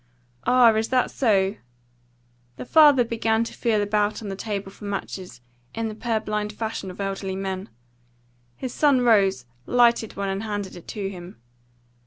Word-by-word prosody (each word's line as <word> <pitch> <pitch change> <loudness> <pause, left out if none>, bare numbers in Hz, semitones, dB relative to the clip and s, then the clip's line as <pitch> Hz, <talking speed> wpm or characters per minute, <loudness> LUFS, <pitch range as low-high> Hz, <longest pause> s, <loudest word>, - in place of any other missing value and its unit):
"Ah, 245 -2 +6
is 220 +1 0
that 255 -1 +1
so?" 200 -5 +1 1.0
The - - -7
father 290 -3 +6
began 225 -1 0
to 230 - -7
feel 220 -4 +1
about 210 +1 0
on 205 - -5
the 195 - -4
table 200 -1 -4
for 205 - -12
matches, 190 -9 -6 0.3
in 225 0 -2
the - - -6
purblind 215 -2 -2
fashion 220 -3 -4
of 180 - -10
elderly 195 -1 -3
men. 190 0 -4 0.9
His 255 -2 -6
son 285 -4 +3
rose, 195 - +3 0.2
lighted 235 -2 +3
one, 200 0 -2
and 195 +1 -2
handed 205 -3 -4
it 175 - -12
to 200 -2 -4
him. 180 -1 -10
210 Hz, 160 wpm, -24 LUFS, 195-230 Hz, 1.0 s, Ah